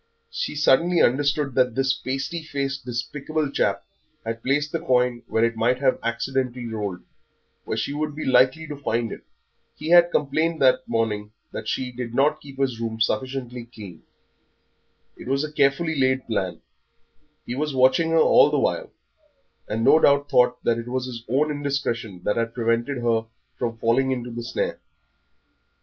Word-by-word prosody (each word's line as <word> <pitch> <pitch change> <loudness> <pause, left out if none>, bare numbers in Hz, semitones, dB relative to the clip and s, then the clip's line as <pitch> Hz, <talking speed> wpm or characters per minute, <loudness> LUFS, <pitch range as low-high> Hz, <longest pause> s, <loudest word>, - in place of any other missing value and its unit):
She - - -3
suddenly 165 +4 +3
understood 145 +2 +2
that 125 -2 +2
this 135 -1 +2
pasty 140 +6 -4
faced, 140 -3 -4
despicable 140 +5 -3
chap - - 0 0.4
had 115 0 -4
placed 145 +4 0
the 165 - -1
coin 125 -6 +1
where 110 - +1
it 115 0 -1
might 115 +3 +2
have 130 -1 +1
accidentally 125 +1 -2
rolled, 105 -5 -4 0.6
where 110 - -3
she 115 +6 -2
would 150 0 -3
be 155 - -5
likely 130 +4 +3
to 150 -1 -6
find 120 -5 -2
it. - - -7 0.5
He 155 - -6
had 175 0 +7
complained 155 +2 0
that 130 -1 +3
morning 105 -2 -1 0.2
that 110 - -6
she 125 +2 -2
did 120 -1 -6
not 150 +3 +2
keep 135 -2 -12
his 130 -4 -1
room 115 -1 -3
sufficiently 125 0 -2
clean! 100 -8 -11 1.2
It - - -11
was 135 +2 +1
a 155 - -4
carefully 150 +3 +2
laid 130 -1 +1
plan, 95 -5 -2 0.8
he 120 - -4
was 145 +1 -2
watching 130 +6 +4
her 165 - +2
all - - +6
the - - 0
while, - - 0 0.8
and 110 +2 -2
no 155 - +6
doubt 140 -1 +3
thought 125 0 +3
that 115 0 +1
it 115 - -7
was 130 +1 -2
his 120 -3 -7
own 150 +5 +2
indiscretion 135 -9 -3
that 105 - 0
had 115 0 -1
prevented 120 +2 0
her 115 -1 +1 0.3
from 115 -2 -3
falling 120 +4 +2
into 125 -2 -3
the 120 +1 -5
snare. 115 - -3
130 Hz, 170 wpm, -24 LUFS, 115-145 Hz, 1.2 s, had